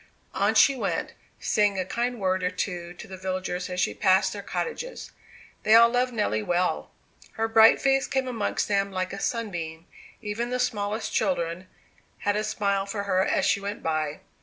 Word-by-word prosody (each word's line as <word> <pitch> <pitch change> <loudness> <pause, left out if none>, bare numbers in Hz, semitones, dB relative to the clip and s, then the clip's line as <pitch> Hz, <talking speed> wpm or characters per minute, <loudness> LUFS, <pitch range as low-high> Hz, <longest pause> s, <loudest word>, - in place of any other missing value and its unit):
On - - +1
she 275 - +6
went, 255 - -2 0.3
saying 205 -2 +2
a 185 - -1
kind 240 +4 -2
word 185 -1 0
or 180 - +1
two 180 -2 -4
to - - -10
the 190 - -8
villagers 185 -1 -3
as 180 0 -4
she - - +1
passed 190 -1 +3
their 205 - -6
cottages. 475 - -5 0.5
They 215 - +5
all 235 0 +8
loved 250 +1 +1
Nelly 210 - 0
well. 175 +10 0 0.4
Her 225 -1 -1
bright 225 0 +6
face 270 0 +2
came 265 -1 -1
amongst 230 -5 -1
them 200 -1 +1
like 185 0 -3
a 200 - -5
sunbeam; 175 -9 -3 0.3
even 225 +3 -3
the 250 - -1
smallest 210 -2 -2
children 180 -3 -1 0.5
had 205 0 +1
a 210 - 0
smile 200 -2 -1
for 200 0 -3
her 190 -2 +2
as - - +1
she - - +2
went 205 +1 -5
by. 155 -2 -2
200 Hz, 185 wpm, -26 LUFS, 185-225 Hz, 0.5 s, all